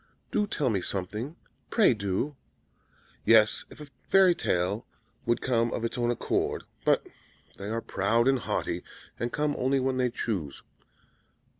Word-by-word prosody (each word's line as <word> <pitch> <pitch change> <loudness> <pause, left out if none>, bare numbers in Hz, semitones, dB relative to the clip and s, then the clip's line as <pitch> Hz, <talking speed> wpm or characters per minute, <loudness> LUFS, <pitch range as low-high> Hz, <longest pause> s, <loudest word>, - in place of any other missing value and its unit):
"Do 210 - +1
tell 145 - 0
me 100 -3 0
something! 105 - -3 0.3
Pray 215 - +5
do!" 105 +7 -2 0.9
"Yes, 110 -1 +5
if - - -14
a 150 - -7 0.2
fairy 190 -2 +6
tale 95 - 0 0.4
would 120 - +2
come 120 -2 +2
of 115 - -2
its 115 - -2
own 120 -1 0
accord; 120 - 0 0.2
but - - +3 0.5
they 100 +1 -6
are 115 +1 -1
proud 115 +5 +1
and 135 -1 +4
haughty, - - -2 0.4
and 120 0 -1
come 150 0 0
only 135 +2 +2
when 130 0 0
they 125 -1 +2
choose. 95 - -3
120 Hz, 150 wpm, -28 LUFS, 105-135 Hz, 0.9 s, fairy